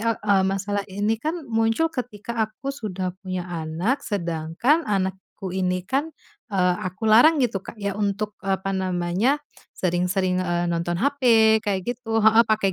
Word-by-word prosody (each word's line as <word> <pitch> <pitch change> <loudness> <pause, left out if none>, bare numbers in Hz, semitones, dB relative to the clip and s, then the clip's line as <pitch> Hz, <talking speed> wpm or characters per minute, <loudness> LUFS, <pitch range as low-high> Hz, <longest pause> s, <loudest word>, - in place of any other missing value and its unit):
e 230 +1 +1
eee, 200 -2 +2
masalah 200 +1 -1
ini 205 +3 0
kan 320 +5 -2
muncul 225 +7 +2
ketika 235 -3 -5
aku 220 +6 -9
sudah 190 -8 -4
punya 185 -2 -4
anak, 170 - -1
sedangkan 170 - 0
anakku 190 -1 -3
ini 185 -1 0
kan, 290 +5 -1 0.4
eee, 180 -2 +3
aku 185 +4 -5
larang 280 +8 +6
gitu 215 -6 0
Kak - - -9
ya, 200 0 -2
untuk 210 0 -2
apa 195 0 -1
namanya, 185 +9 0 0.4
sering-sering, 180 +1 0
e 175 -1 0
nonton 170 0 -1
HP 280 +2 0 0.4
kayak 195 -3 0
gitu 225 -2 -1
heeh, 220 +2 +6
pake 215 -3 +1
200 Hz, 150 wpm, -24 LUFS, 185-225 Hz, 0.4 s, larang